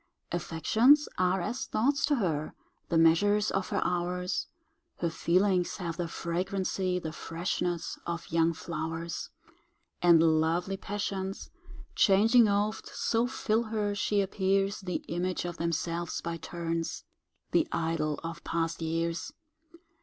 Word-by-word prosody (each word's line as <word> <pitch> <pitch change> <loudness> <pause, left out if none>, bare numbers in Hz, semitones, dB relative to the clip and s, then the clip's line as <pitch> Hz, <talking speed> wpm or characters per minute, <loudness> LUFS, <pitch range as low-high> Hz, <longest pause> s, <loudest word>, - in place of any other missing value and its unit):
Affections 220 - +3
are 185 0 +2
as 240 +8 -3
thoughts 280 +6 +1
to 290 - +3
her, 160 - -1 0.3
The 165 - +2
measures 205 +6 +4
of 195 -1 -1
her - - 0
hours; 180 +1 -1 0.5
Her 170 -1 -1
feelings 180 +2 +2
have 170 -3 -4
the 175 -2 -2
flagrancy, 185 +2 -1
The 160 -3 -4
freshness 170 +1 -3
of 170 -1 -4
young 165 0 +3
flowers; 165 0 -4 0.7
And 165 -2 +5
lovely 175 +4 0
passions, 195 -1 -4 0.4
changing 220 +4 +5
oft, 205 +1 0
So 230 +1 0
fill 230 -2 0
her, 215 -2 -1
she 205 0 +1
appears 195 +1 +1
The 180 -2 -4
image 180 +1 -2
of 175 -1 -4
themselves 170 0 -2
by 170 0 -4
turns,— 165 0 -3 0.5
The 335 -2 +3
idol 160 -2 -1
of 165 0 -6
past 165 0 -2
years! 165 +7 -2
180 Hz, 125 wpm, -29 LUFS, 165-200 Hz, 0.7 s, And